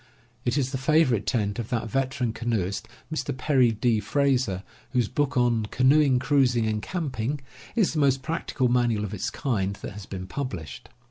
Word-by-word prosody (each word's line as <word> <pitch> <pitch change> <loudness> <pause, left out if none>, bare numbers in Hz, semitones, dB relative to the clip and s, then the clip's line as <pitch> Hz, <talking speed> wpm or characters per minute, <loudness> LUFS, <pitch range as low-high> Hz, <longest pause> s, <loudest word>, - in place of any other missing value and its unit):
It 120 +2 +1
is 130 -2 0
the 130 - -2
favorite 130 -6 +3
tent 105 -3 0
of 115 - -4
that 115 -2 -1
veteran 130 0 -1
canoeist, 110 -5 -2 0.3
Mr. 135 -4 -2
Perry 130 -4 +3
D. 110 +1 +1
Frazer, 125 -4 +1 0.3
whose 125 -4 +2
book 140 -1 -1
on 120 -3 +2
Canoe 135 +2 +4
Cruising 125 -3 +2
and 110 -1 -1
Camping 140 - -2 0.4
is 215 -8 +2
the 155 - 0
most 135 -2 +3
practical 155 -4 -1
manual 120 -3 +2
of 105 - -6
its 100 - -2
kind 100 -8 -1
that - - -7
has 100 0 -9
been 95 -2 -6
published. 95 - -6
125 Hz, 175 wpm, -26 LUFS, 110-135 Hz, 0.4 s, Canoe